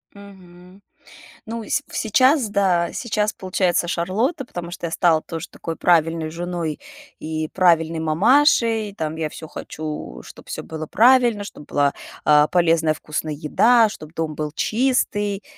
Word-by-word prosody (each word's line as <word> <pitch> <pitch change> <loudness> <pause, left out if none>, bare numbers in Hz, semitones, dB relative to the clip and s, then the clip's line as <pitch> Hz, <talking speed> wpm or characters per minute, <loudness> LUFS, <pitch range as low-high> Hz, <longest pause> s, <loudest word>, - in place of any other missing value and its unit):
Мгм. 185 -1 -15 0.6
Ну, 230 0 -6
сь 280 - 0
в - - -6
сейчас, 255 +3 +3
да, 185 -4 +1
сейчас 215 -3 -1
получается 180 -2 0
Шарлотта, 225 - -1
потому 175 -5 -7
что 175 - -6
я - - -7
стала 165 -3 +3
тоже 165 +1 -7
такой 165 - -6
правильной 165 -2 +2
женой 170 -2 -4 0.4
и 155 0 -4
правильной 165 -3 +3
мамашей, 225 - +3
там, 160 0 -3
я 160 - -1
всё 155 +1 -10
хочу, 155 -1 -7
чтоб - - -14
всё - - -5
было 160 -1 -6
правильно, 240 -3 +4
чтоб 150 - -10
была, 140 -1 +1 0.3
а, 150 0 +5
полезная, 165 -3 +2
вкусная 155 0 -4
еда, 220 +10 +3
чтоб 155 -5 -11
дом 160 -2 -3
был 150 -1 -4
чистый, 210 -4 0
175 Hz, 145 wpm, -21 LUFS, 160-210 Hz, 0.6 s, а